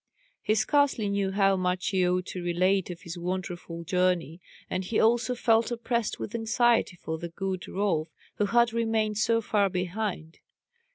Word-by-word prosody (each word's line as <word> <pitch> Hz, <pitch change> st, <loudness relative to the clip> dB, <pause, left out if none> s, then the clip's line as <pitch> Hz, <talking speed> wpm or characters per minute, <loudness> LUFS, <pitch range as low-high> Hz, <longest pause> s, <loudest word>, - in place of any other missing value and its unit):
He 215 Hz, -, +1 dB
scarcely 280 Hz, -5 st, +2 dB
knew 200 Hz, -1 st, 0 dB
how 195 Hz, 0 st, +3 dB
much 180 Hz, 0 st, -1 dB
he 185 Hz, -3 st, +2 dB
ought 180 Hz, 0 st, 0 dB
to 185 Hz, -, -6 dB
relate 185 Hz, +2 st, +1 dB
of 175 Hz, -1 st, -7 dB
his 170 Hz, +1 st, -7 dB
wonderful 175 Hz, -1 st, -4 dB
journey, 180 Hz, -1 st, 0 dB, 0.3 s
and 185 Hz, -, -2 dB
he 210 Hz, +4 st, -1 dB
also 240 Hz, +2 st, +3 dB
felt 230 Hz, -1 st, +3 dB
oppressed 235 Hz, -1 st, -1 dB
with 205 Hz, -, -6 dB
anxiety 230 Hz, -2 st, +2 dB
for 160 Hz, -2 st, -5 dB
the 170 Hz, -, -5 dB
good 185 Hz, +1 st, -4 dB
Rolf, 185 Hz, -6 st, 0 dB, 0.3 s
who 205 Hz, -, +1 dB
had 235 Hz, +1 st, +3 dB
remained 220 Hz, -2 st, 0 dB
so 230 Hz, +1 st, +2 dB
far 205 Hz, -2 st, +1 dB
behind. 180 Hz, -2 st, -3 dB
195 Hz, 165 wpm, -27 LUFS, 180-225 Hz, 0.3 s, how